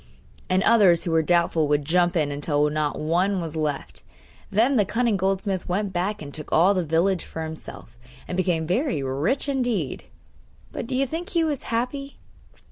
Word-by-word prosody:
And 185 +1 +2
others 195 -7 +5
who 170 - -2
were 165 0 +4
doubtful 170 -1 +2
would 145 0 +1
jump 175 +3 +2
in, 150 -3 +1
until 145 +1 +1
not 150 -1 -1
one 180 +5 +1
was 165 -2 -5
left. 150 -3 -3 0.5
Then 235 +7 +3
the 215 - +4
cunning 230 +2 0
goldsmith 190 0 -1
went 195 +2 -1
back 180 +1 -2
and 140 -1 -9
took 150 - -7
all 180 +5 +5
the 185 -2 0
village 170 +4 +1
for 160 - -6
himself, 155 -7 -9 0.3
and - - -4
became 175 -3 0
very 185 - 0
rich 140 - -1
indeed. 245 - -1 0.7
But - - -5
do 260 - -3
you 270 +2 +2
think 330 +7 -5
he 340 -4 +1
was 300 -4 -1
happy? 255 +4 -3
180 Hz, 180 wpm, -24 LUFS, 155-225 Hz, 0.7 s, others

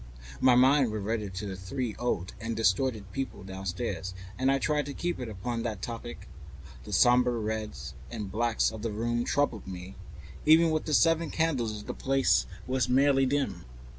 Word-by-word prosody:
My 130 -2 +5
mind 130 -1 +5
reverted 105 -2 -3
to 100 +3 -4
the 95 -2 -4
three 110 +5 -4
old 95 -7 -1
and 115 0 -3
distorted 110 0 +1
people 115 -3 -4
downstairs, 95 0 -4 0.2
and 130 +4 +2
I 135 - +3
tried 150 +1 0
to 140 - -6
keep 175 -3 -2
it 125 -3 -4
upon 115 +4 -3
that 110 -4 -4
topic. 120 0 -6 0.6
The - - -8
sombre 125 0 +5
reds 105 - -4 0.2
and 100 +6 -5
grays 115 +2 +1
of 110 -1 -8
the 115 0 -2
room 120 +3 -1
troubled 145 -9 0
me; 90 0 -7 0.5
even 160 +1 +6
with 155 0 -1
its 150 - +5
seven 165 -1 +3
candles 120 -10 -1
the - - -5
place 135 - +2 0.2
was 130 -1 0
merely 135 +1 +4
dim. 140 +1 -1
120 Hz, 170 wpm, -29 LUFS, 105-135 Hz, 0.6 s, even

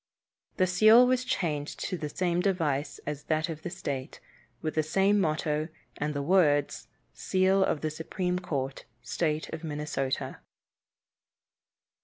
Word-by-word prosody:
The 185 - +4
seal 215 +7 +7
was 255 0 +2
changed 165 - -2
to 185 - -2
the 150 -3 -4
same 175 +1 0
device 155 -7 0
as 150 -1 -5
that 155 +1 0
of 155 -1 -5
the 175 - -5
state, 140 -7 -5 0.4
with 155 - -3
the 155 - +2
same 195 +6 +2
motto 155 -2 0 0.3
and 150 0 -3
the 140 - -1
words, 145 -4 +2 0.3
"Seal 190 +1 +2
of 155 - 0
the 155 - -1
Supreme 180 +3 -2
Court, 135 -6 -4 0.2
State 155 +5 -1
of 160 0 -5
Minnesota." 150 -3 -3
160 Hz, 140 wpm, -29 LUFS, 150-185 Hz, 0.4 s, seal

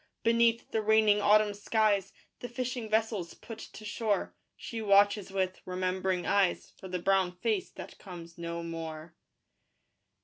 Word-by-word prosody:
Beneath 230 0 +3
the 220 - +1
raining 215 -1 +4
autumn 210 0 +4
skies 205 -1 +1 0.3
The 245 - -6
fishing 245 -2 -4
vessels 215 -5 0
put 225 -1 -10
to 215 - -10
shore: 210 -1 -1 0.2
She 230 -4 -6
watches 205 -1 +4
with 190 -1 -1
remembering 185 0 -1
eyes 195 -3 +1
For 190 - -10
the 180 0 -2
brown 190 0 +2
face 215 -2 -1
that - - -11
comes 170 -3 -10
no 170 0 -5
more. 165 -1 -6
200 Hz, 140 wpm, -30 LUFS, 180-220 Hz, 0.3 s, raining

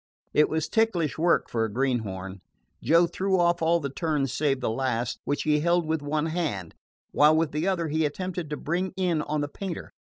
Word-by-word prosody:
It 150 - +4
was 160 0 -1
ticklish 185 -10 +1
work 170 +1 +3
for 115 -1 -1
a 110 - -2
greenhorn. 100 -7 -2 0.4
Joe 165 +7 +5
threw 190 +2 0
off 175 0 +2
all 165 +1 +3
the 140 -4 -4
turns 145 -4 -1
save 140 -2 +1
the 125 - -1
last, 120 -1 -1
which 145 - -1
he 150 -1 +2
held 170 +2 +2
with 160 -1 -1
one 150 +1 -1
hand, 155 - -3 0.4
while 150 +2 +5
with 160 -1 +1
the 155 +5 -1
other 175 -4 0
he 160 +2 +1
attempted 175 +2 -3
to 150 - -3
bring 180 +4 -2
in 175 -4 +1
on 150 0 -2
the 145 - -1
painter. 180 +4 -6
155 Hz, 200 wpm, -26 LUFS, 135-170 Hz, 0.4 s, Joe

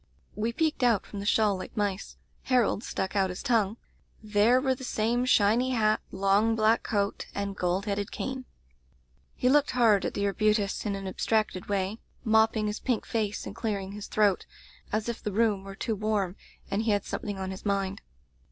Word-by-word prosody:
"We 220 +2 -1
peeked 310 +3 0
out 235 -5 +3
from 205 - -7
the 200 - -4
shawl 210 -2 +3
like 185 - -9
mice. 205 -2 -2 0.3
Harold 245 -4 +2
stuck 190 +2 -3
out 195 -2 +2
his 180 - -6
tongue. 225 -3 +1 0.5
There 215 +4 +4
were 265 0 +1
the 260 - -9
same 240 +1 0
shiny 240 +2 +3
hat, 215 -1 +2
long 200 +4 +2
black 220 +1 +3
coat, 200 -2 -1
and 200 -1 -3
gold 180 +2 0
headed 200 -1 -2
cane. 260 -1 -4 0.9
"He 250 - 0
looked 290 +2 +4
hard 220 -5 +5
at - - -3
the 200 - 0
arbutus, 210 +1 +1
in 200 - -1
an 195 0 -6
abstracted 195 0 -1
way, 200 +2 -1 0.2
mopping 220 0 +3
his 210 +1 -2
pink 245 -4 -1
face 210 -3 -2
and - - -7
clearing 200 -4 -3
his 205 0 -7
throat, 205 -3 +2 0.4
as 215 +1 -1
if 235 - -4
the 210 - -3
room 210 -2 +1
were 195 0 -8
too 225 - -2
warm 205 -3 -1 0.4
and 200 - +1
he 225 - -1
had 205 -1 +1
something 205 -2 -4
on 190 0 -4
his 190 - -8
mind. 200 -1 -1
210 Hz, 190 wpm, -28 LUFS, 200-225 Hz, 0.9 s, hard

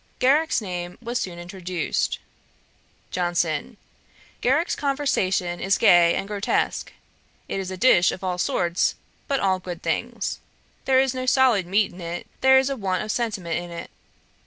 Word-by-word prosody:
Garrick's 290 +2 +3
name 180 -3 -5
was 240 +1 -3
soon 175 -2 -5
introduced. 175 -1 -2 0.9
JOHNSON. 175 +3 -1 0.6
'Garrick's 290 +8 +2
conversation 195 -11 0
is 195 +1 +2
gay 170 -1 +6
and 195 - -3
grotesque. 205 0 -1 0.6
It - - -3
is 190 -1 -4
a 185 - -5
dish 180 -5 +5
of 190 - -8
all 180 -1 -2
sorts, 175 -1 +1 0.3
but 275 -1 +1
all 190 -1 +1
good 180 -1 -7
things. - - -2 0.5
There 260 -1 +4
is 265 -1 +2
no 255 0 -4
solid 250 -9 +4
meat 200 +2 +1
in 180 - -11
it: 170 +1 -5 0.2
there 265 0 +7
is 265 +1 +2
a - - -1
want 195 -4 -1
of 215 - -3
sentiment 200 -9 -2
in 175 0 -8
it. 170 0 -8
190 Hz, 160 wpm, -24 LUFS, 175-255 Hz, 0.9 s, there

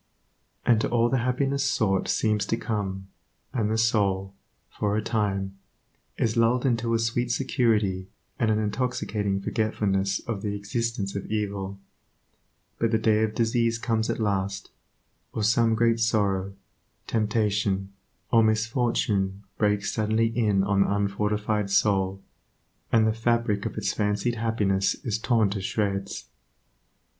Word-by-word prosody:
And 115 -2 +4
to - - 0
all 120 0 +2
the 130 - +1
happiness 135 +3 0
sought 100 -8 +1
seems 105 -2 +1
to 115 - 0
come, 95 -4 -3 0.4
and 110 -4 0
the 110 - 0
soul, 100 -4 +1 0.3
for 105 0 -1
a - - +1
time, 100 -3 -1 0.6
is 110 -1 0
lulled 120 +2 +2
into 115 -2 +1
a - - +4
sweet 115 +2 0
security, 110 -8 +1 0.3
and 115 - +2
an 110 - +2
intoxicating 105 -3 -1
forgetfulness 100 -2 0
of 110 -4 -4
the 105 -1 -2
existence 105 0 -3
of 100 - -4
evil; 100 -2 -3 1.0
but 115 - +2
the 110 - +2
day 110 -1 +2
of 110 -1 0
disease 115 0 +1
comes 115 -1 -1
at - - 0
last, 100 -2 -1 0.6
or 110 - -2
some 115 +1 +3
great 115 0 +2
sorrow, 100 -4 +1 0.5
temptation, 105 -3 0 0.4
or 115 - +6
misfortune 110 -3 0 0.2
breaks 105 -1 +1
suddenly 115 +1 0
in 105 -5 +2
on 100 0 +2
the - - +2
unfortified 105 +1 0
soul, 95 -1 +1 0.7
and 115 -1 +4
the 110 - +2
fabric 115 -2 0
of - - -8
its - - -1
fancied 105 +3 0
happiness 110 -4 +1
is 110 -2 -1
torn 110 -4 +2
to 100 -1 -3
shreds. 100 0 -2
110 Hz, 140 wpm, -26 LUFS, 100-115 Hz, 1.0 s, or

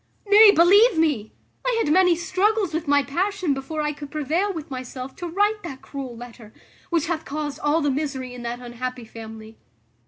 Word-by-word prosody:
Nay, 415 +1 +8
believe 405 +4 +6
me, 290 -10 +1 0.3
I - - 0
had 300 -9 +2
many 360 -1 +5
struggles 375 +2 0
with 320 0 -3
my 285 0 +4
passion 365 +2 -1
before 275 +3 -4
I 300 0 -1
could 290 -1 -9
prevail 315 +7 -1
with 320 -4 -7
myself 255 0 -7
to 350 - -5
write 410 +5 +1
that 275 -8 -8
cruel 265 -4 -7
letter, 235 -2 -11 0.4
which 335 -3 +1
hath 320 -1 -2
caused 295 0 -5
all 295 +3 +1
the 290 -1 +1
misery 265 -3 -3
in 250 - -9
that 240 0 -4
unhappy 250 0 -6
family. 220 0 -11
300 Hz, 185 wpm, -23 LUFS, 255-350 Hz, 0.4 s, Nay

